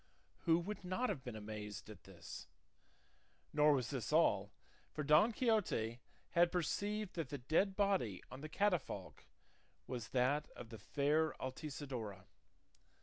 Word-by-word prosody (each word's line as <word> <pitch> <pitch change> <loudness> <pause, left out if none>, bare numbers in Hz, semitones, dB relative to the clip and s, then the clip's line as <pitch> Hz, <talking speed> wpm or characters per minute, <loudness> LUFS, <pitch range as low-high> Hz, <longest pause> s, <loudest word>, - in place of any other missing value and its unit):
Who 165 -1 +6
would 195 +5 -4
not 185 +8 0
have 130 - -3
been 125 -4 -6
amazed 105 -1 -6
at 105 -4 -11
this? 85 -4 -9 1.1
Nor 150 0 +6
was 125 -5 0
this 130 -3 -3
all, 105 -11 +4 0.4
for 150 - -3
Don 155 +10 +6
Quixote 210 - +1 0.3
had 170 0 +5
perceived 205 +4 -1
that 165 -6 -3
the 145 - -3
dead 160 +9 +2
body 190 - +1
on 130 - -8
the 155 - -6
catafalque 185 -4 -1 0.6
was 120 -3 -4
that 135 +4 +1
of 120 - -9
the 110 -2 -9
fair 150 +8 +2
Altisidora. 130 -8 -5
145 Hz, 140 wpm, -38 LUFS, 115-175 Hz, 1.1 s, Who